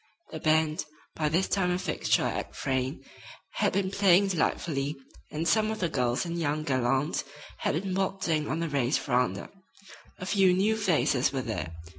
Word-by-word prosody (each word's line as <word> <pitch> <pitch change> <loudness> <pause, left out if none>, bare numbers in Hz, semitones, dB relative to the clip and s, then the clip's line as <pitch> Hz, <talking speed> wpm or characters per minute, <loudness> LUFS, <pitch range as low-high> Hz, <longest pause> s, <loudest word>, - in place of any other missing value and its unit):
The 160 - -5
band, 155 0 +2 0.3
by 155 -1 0
this 175 +5 +1
time 190 -2 +1
a 180 - +1
fixture 185 - 0
at - - -3
Frayne, 130 -1 -2 0.5
had - - +2
been 190 0 0
playing 195 0 +4
delightfully, 150 -4 -1 0.3
and 160 +2 -3
some 215 +4 +3
of 220 - -3
the 170 - 0
girls 125 -1 0
and 170 0 -3
young 155 -1 -1
gallants 130 +2 0 0.4
had 155 - 0
been 190 -2 -3
waltzing 185 -5 0
on 160 - -1
the 165 - -1
Rays' 135 -2 +1
veranda. 125 -7 -1 0.7
A 185 - -6
few 190 -1 +4
new 210 +4 +2
faces 170 - +2
were 135 -2 -2
there. 110 -8 -4
160 Hz, 170 wpm, -28 LUFS, 135-185 Hz, 0.7 s, playing